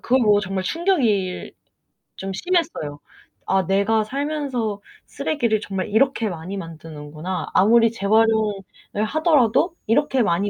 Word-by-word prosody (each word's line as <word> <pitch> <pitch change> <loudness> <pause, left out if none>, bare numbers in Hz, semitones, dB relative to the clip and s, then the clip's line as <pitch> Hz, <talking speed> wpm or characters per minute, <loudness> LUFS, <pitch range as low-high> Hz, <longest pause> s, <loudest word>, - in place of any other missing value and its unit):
그걸 260 +2 +2
보고 210 -2 +4
정말 190 -1 -3
충격이 235 - 0 0.6
좀 195 0 -5
심했어요. 315 - -1 0.5
'아 190 -2 +1
내가 200 +3 +2
살면서 265 -5 -3 0.2
쓰레기를 235 -8 -1
정말 195 -1 -4
이렇게 230 -1 +2
많이 180 +3 -6
만드는구나. 160 0 -6
아무리 230 +3 +5
재활용을 220 0 +2 0.5
하더라도 310 - +2
이렇게 265 +1 +2
많이 200 +1 +1
215 Hz, 295 characters per minute, -22 LUFS, 190-265 Hz, 0.6 s, 아무리